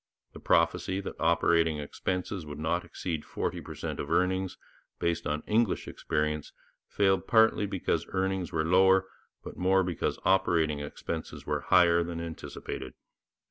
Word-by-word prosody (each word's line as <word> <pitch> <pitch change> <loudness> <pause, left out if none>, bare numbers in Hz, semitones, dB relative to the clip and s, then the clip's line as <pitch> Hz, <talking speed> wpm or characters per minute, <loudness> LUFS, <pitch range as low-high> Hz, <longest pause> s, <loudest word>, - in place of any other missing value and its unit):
The - - -10
prophecy 85 +3 +2
that 100 - -6
operating 85 -1 +3
expenses 90 +5 -3
would 75 -1 -8
not 80 +3 -1
exceed 80 -4 -4
forty - - -3
per - - -9
cent - - -5
of - - -4
earnings, 95 0 +1 0.4
based 85 0 -1
on 75 +1 -2
English 110 -2 +1
experience, 75 -1 -2 0.3
failed 95 -1 +1
partly 110 -2 +4
because 90 -4 -1
earnings 95 -1 -1
were 80 -1 0
lower, 95 +2 +5 0.4
but - - -9
more 95 +1 +3
because 90 -3 -2
operating 80 -5 +2
expenses 80 +2 -6
were - - -1
higher, 85 -1 +4
than 85 -1 -5
anticipated. 85 -2 -6
85 Hz, 140 wpm, -29 LUFS, 80-95 Hz, 0.4 s, lower